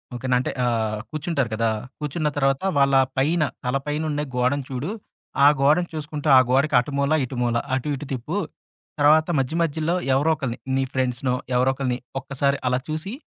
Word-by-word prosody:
"Okay 120 Hz, +2 st, -5 dB
నా? 125 Hz, -, +5 dB
అంటే 125 Hz, -, -2 dB
ఆహ్, 110 Hz, -3 st, 0 dB
కూర్చుంటారు 155 Hz, -5 st, -1 dB
కదా! 115 Hz, +1 st, +1 dB, 0.3 s
కూర్చున్న 150 Hz, +1 st, -2 dB
తర్వాత 135 Hz, -1 st, +2 dB, 0.2 s
వాళ్ళ 140 Hz, 0 st, +4 dB, 0.2 s
పైన 155 Hz, +5 st, +2 dB, 0.2 s
తల 125 Hz, +2 st, 0 dB
పైనుండి 150 Hz, 0 st, -1 dB
గోడను 130 Hz, +3 st, +1 dB
చూడు. 135 Hz, +5 st, -3 dB, 0.6 s
ఆ -, -, +10 dB
గోడను 155 Hz, +5 st, +3 dB
చూసుకుంటూ, 150 Hz, -1 st, -5 dB
ఆ -, -, +9 dB
గోడకి 135 Hz, +2 st, +2 dB
అటు 125 Hz, +4 st, -3 dB
మూల, 140 Hz, +2 st, +2 dB
ఇటు 130 Hz, -, -8 dB
మూల, 120 Hz, -1 st, +1 dB, 0.2 s
అటు 130 Hz, +3 st, -3 dB
ఇటు 140 Hz, -, -7 dB
తిప్పు. 135 Hz, +10 st, -3 dB, 0.6 s
తర్వాత 155 Hz, +2 st, +5 dB
మధ్య 135 Hz, +4 st, -1 dB
మధ్యలో 160 Hz, +2 st, -1 dB, 0.2 s
ఎవరో 145 Hz, +4 st, +2 dB
ఒకళ్ళని 130 Hz, -5 st, -4 dB, 0.2 s
నీ 135 Hz, -, +2 dB
ఫ్రెండ్స్‌నో 125 Hz, 0 st, 0 dB, 0.2 s
ఎవరో 130 Hz, +2 st, +3 dB
ఒకళ్ళని 130 Hz, -2 st, -2 dB, 0.2 s
ఒక్కసారి 140 Hz, +1 st, -1 dB
అలా 125 Hz, 0 st, +1 dB
చూసి, 155 Hz, +7 st, -4 dB
140 Hz, 170 wpm, -23 LUFS, 125-155 Hz, 0.6 s, ఆ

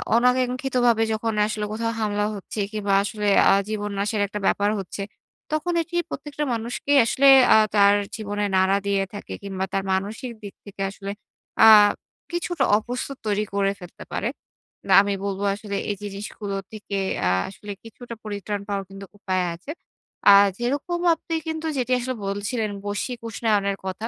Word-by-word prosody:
অনাকাঙ্ক্ষিতভাবে 250 Hz, -1 st, +2 dB
যখন 225 Hz, +1 st, -1 dB
আসলে 215 Hz, -1 st, -3 dB
কোথাও 230 Hz, +1 st, -1 dB
হামলা 205 Hz, -1 st, 0 dB
হচ্ছে 200 Hz, +2 st, -7 dB
কিংবা 205 Hz, -2 st, -1 dB
আসলে 210 Hz, 0 st, -3 dB, 0.2 s
আ -, -, +6 dB, 0.2 s
জীবন 210 Hz, -1 st, -3 dB
নাশের 210 Hz, +1 st, 0 dB
একটা 210 Hz, +1 st, -5 dB
ব্যাপার 205 Hz, 0 st, +2 dB
হচ্ছে, 195 Hz, +1 st, -6 dB, 0.5 s
তখন 310 Hz, +3 st, -1 dB
এটি 340 Hz, +2 st, -7 dB
প্রত্যেকটা 295 Hz, +1 st, -5 dB
মানুষকেই 235 Hz, +5 st, 0 dB
আসলে 275 Hz, +3 st, +3 dB, 0.3 s
আ -, -, +8 dB, 0.2 s
তার 200 Hz, 0 st, +6 dB, 0.2 s
জীবনে 205 Hz, -2 st, -3 dB
নাড়া 190 Hz, +1 st, +3 dB
দিয়ে 195 Hz, -1 st, +2 dB
থাকে 205 Hz, -, -7 dB
কিংবা 190 Hz, -1 st, -3 dB
তার 195 Hz, -, 0 dB
মানসিক 215 Hz, +7 st, -3 dB
দিক 200 Hz, -, -8 dB
থেকে 200 Hz, -1 st, -9 dB
আসলে 195 Hz, 0 st, -7 dB, 0.5 s
আ -, -, +9 dB, 0.6 s
কিছুটা 345 Hz, 0 st, -1 dB, 0.2 s
অপস্তুত 250 Hz, +4 st, -5 dB
তৈরি 210 Hz, 0 st, +1 dB
করে 200 Hz, 0 st, +2 dB
ফেলতে 180 Hz, -1 st, -11 dB
পারে। -, -, -1 dB, 0.6 s
না, 190 Hz, -, +3 dB
আমি 200 Hz, 0 st, -1 dB
বলবো 200 Hz, 0 st, -3 dB
আসলে 205 Hz, -1 st, -6 dB
এই 205 Hz, -, 0 dB
যে 205 Hz, -, -4 dB
জিনিসগুলো 200 Hz, 0 st, -6 dB, 0.2 s
থেকে 210 Hz, -2 st, -5 dB, 0.3 s
আ -, -, +3 dB, 0.2 s
আসলে 205 Hz, +1 st, -9 dB
কিছুটা 235 Hz, +1 st, -10 dB
পরিত্রাণ 205 Hz, -1 st, -4 dB
পাওয়ার 200 Hz, -1 st, -2 dB
কিন্তু 195 Hz, 0 st, -9 dB
উপায় 185 Hz, -2 st, -1 dB
আছে। 200 Hz, -, -9 dB, 0.6 s
আ -, -, +9 dB, 0.3 s
যেরকম 285 Hz, +8 st, -1 dB, 0.2 s
আপনি 330 Hz, +1 st, -5 dB
কিন্তু 320 Hz, 0 st, -3 dB
যেটি 255 Hz, 0 st, -1 dB
আসলে 255 Hz, +1 st, -3 dB
বলছিলেন, 210 Hz, +3 st, -2 dB, 0.2 s
বৈশ্বিক 205 Hz, +4 st, -3 dB
উষ্ণায়নের 205 Hz, -3 st, 0 dB
কথা, 190 Hz, +4 st, -4 dB
210 Hz, 160 wpm, -24 LUFS, 200-245 Hz, 0.6 s, আ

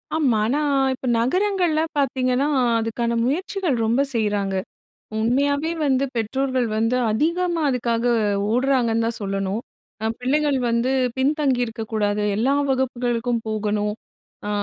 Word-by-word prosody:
ஆமா, 275 Hz, -8 st, +2 dB
ஆனா 275 Hz, +6 st, +1 dB, 0.3 s
இப்ப 260 Hz, -, -8 dB
நகரங்கள்ல 360 Hz, -, +1 dB, 0.2 s
பாத்தீங்கன்னா 260 Hz, -1 st, +1 dB, 0.3 s
அதுக்கான 230 Hz, +1 st, -1 dB
முயற்சிகள் 350 Hz, +3 st, -1 dB
ரொம்ப 235 Hz, +5 st, +2 dB
செய்றாங்க. 205 Hz, -3 st, 0 dB, 0.7 s
உண்மையாவே 285 Hz, +7 st, +1 dB
வந்து 270 Hz, -1 st, +2 dB
பெற்றோர்கள் 255 Hz, +2 st, 0 dB
வந்து 225 Hz, +3 st, +1 dB, 0.2 s
அதிகமா 335 Hz, +8 st, 0 dB
அதுக்காக 235 Hz, -2 st, 0 dB, 0.5 s
ஓட்றாங்கன்னு 240 Hz, -2 st, +2 dB
தான் 230 Hz, 0 st, -2 dB
சொல்லணும். 195 Hz, +1 st, -2 dB, 0.4 s
தான் 220 Hz, +1 st, -1 dB
பிள்ளைகள் 285 Hz, +2 st, +1 dB
வந்து 235 Hz, +2 st, +1 dB, 0.3 s
பின்தங்கி 275 Hz, -1 st, +1 dB
இருக்கக் 225 Hz, -1 st, -7 dB
கூடாது, 210 Hz, -1 st, 0 dB
எல்லா 245 Hz, +6 st, +2 dB, 0.2 s
வகுப்புகளுக்கும் 245 Hz, -2 st, 0 dB
போகணும். 210 Hz, -1 st, -1 dB, 0.5 s
அ, -, -, -2 dB
245 Hz, 115 wpm, -22 LUFS, 225-275 Hz, 0.7 s, ஆமா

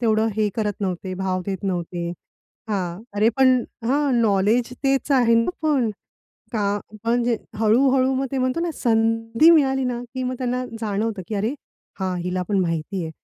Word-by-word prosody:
तेवढं 220 Hz, -1 st, +2 dB
हे 215 Hz, -1 st, +2 dB
करत 210 Hz, -2 st, -2 dB
नव्हते, 185 Hz, -1 st, -3 dB
भाव 185 Hz, -1 st, -2 dB
देत 190 Hz, -1 st, -3 dB
नव्हते. 175 Hz, -2 st, -2 dB, 0.6 s
हां. 185 Hz, -1 st, -2 dB
अरे 215 Hz, +2 st, +4 dB
पण 260 Hz, -1 st, +6 dB, 0.3 s
हां, 275 Hz, +3 st, +2 dB
नॉलेज 220 Hz, +3 st, +2 dB
तेच 270 Hz, +1 st, +1 dB
आहे 240 Hz, -3 st, +4 dB
ना 230 Hz, -, -1 dB
पण. 275 Hz, -7 st, +2 dB, 0.6 s
का 205 Hz, -2 st, 0 dB, 0.2 s
म्हणजे 235 Hz, 0 st, +1 dB, 0.2 s
हळू 225 Hz, +5 st, +4 dB
हळू 260 Hz, 0 st, +2 dB
मग 270 Hz, +1 st, 0 dB
ते 270 Hz, -, -1 dB
म्हणतो 255 Hz, +4 st, 0 dB
ना, 340 Hz, 0 st, -1 dB
संधी 225 Hz, +3 st, +3 dB
मिळाली 270 Hz, -4 st, +3 dB
ना, 245 Hz, -1 st, -2 dB
की 260 Hz, -1 st, -3 dB
मग 255 Hz, 0 st, -2 dB
त्यांना 250 Hz, 0 st, -1 dB
जाणवतं 210 Hz, -1 st, -2 dB
की 215 Hz, -, -3 dB
अरे! 215 Hz, +6 st, 0 dB, 0.5 s
हां, 185 Hz, -1 st, -1 dB
हिला 180 Hz, +1 st, -2 dB
पण 200 Hz, -2 st, +2 dB
माहिती 170 Hz, +1 st, -2 dB
आहे. 160 Hz, -, -5 dB
225 Hz, 170 wpm, -23 LUFS, 195-255 Hz, 0.6 s, पण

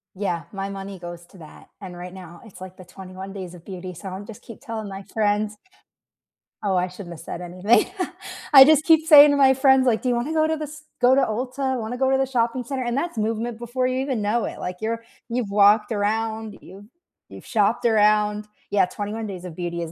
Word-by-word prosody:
Yeah, 180 Hz, -4 st, -2 dB
my 195 Hz, -1 st, -4 dB
money 195 Hz, -1 st, -7 dB
goes 175 Hz, 0 st, -9 dB
to 190 Hz, -, -18 dB
that, 155 Hz, -3 st, -14 dB
and 185 Hz, -3 st, -9 dB
right 180 Hz, +1 st, -9 dB
now 175 Hz, -2 st, -12 dB
it's, 205 Hz, -, -14 dB
like, 185 Hz, 0 st, -10 dB
the 185 Hz, -, -13 dB
21 190 Hz, +1 st, -10 dB
Days 185 Hz, -3 st, -8 dB
of 170 Hz, -1 st, -13 dB
Beauty, 185 Hz, -1 st, -8 dB
so 190 Hz, +3 st, -8 dB
I'm 190 Hz, +2 st, -7 dB
just 215 Hz, -2 st, -11 dB
keep 230 Hz, -, -12 dB
telling 225 Hz, -5 st, -6 dB
my 195 Hz, 0 st, -8 dB
friends. 210 Hz, 0 st, -1 dB, 1.1 s
Oh, 195 Hz, -2 st, 0 dB
I 180 Hz, 0 st, +1 dB
shouldn't 180 Hz, -2 st, -9 dB
have 160 Hz, -, -11 dB
said 175 Hz, -, -7 dB
anything. 185 Hz, +6 st, +2 dB, 0.7 s
I 270 Hz, -1 st, +11 dB
just 305 Hz, 0 st, +4 dB
keep 320 Hz, -2 st, +4 dB
saying 295 Hz, -2 st, +9 dB
to 285 Hz, -, +1 dB
my 265 Hz, -1 st, +6 dB
friends, 265 Hz, -1 st, +4 dB
like, 225 Hz, -2 st, +2 dB
"Do 250 Hz, -, 0 dB
you 240 Hz, -, +2 dB
wanna 260 Hz, +7 st, -2 dB
go 315 Hz, 0 st, +3 dB
to 320 Hz, 0 st, 0 dB
the 305 Hz, -1 st, -5 dB
st 305 Hz, +1 st, -13 dB
go 250 Hz, +1 st, +5 dB
to 275 Hz, -, +4 dB
Ulta? 255 Hz, +3 st, -2 dB
Wanna 225 Hz, +3 st, -5 dB
go 265 Hz, 0 st, +1 dB
to 265 Hz, -, +3 dB
the 270 Hz, -, +2 dB
shopping 245 Hz, 0 st, 0 dB
center?" 260 Hz, +1 st, -4 dB
And 240 Hz, +1 st, -2 dB
that's 310 Hz, -3 st, -3 dB
movement 225 Hz, +2 st, -2 dB
before 245 Hz, +2 st, -2 dB
you 255 Hz, 0 st, -1 dB
even 265 Hz, -5 st, -2 dB
know 215 Hz, +3 st, 0 dB
it, -, -, -7 dB
like, 180 Hz, 0 st, -5 dB
you're 230 Hz, +1 st, -3 dB, 0.2 s
you've 235 Hz, -3 st, -2 dB
walked 205 Hz, +3 st, +4 dB
around, 220 Hz, +1 st, -2 dB
you've 195 Hz, +3 st, -13 dB, 0.4 s
you've -, -, -12 dB
shopped 225 Hz, +1 st, +1 dB
around 210 Hz, -1 st, +2 dB, 0.2 s
Yeah, 200 Hz, -2 st, +3 dB
21 210 Hz, +4 st, -5 dB
Days 185 Hz, -3 st, -7 dB
of 165 Hz, -3 st, -8 dB
Beauty 170 Hz, -1 st, -4 dB
is 165 Hz, -1 st, -5 dB
215 Hz, 230 wpm, -23 LUFS, 190-250 Hz, 1.1 s, I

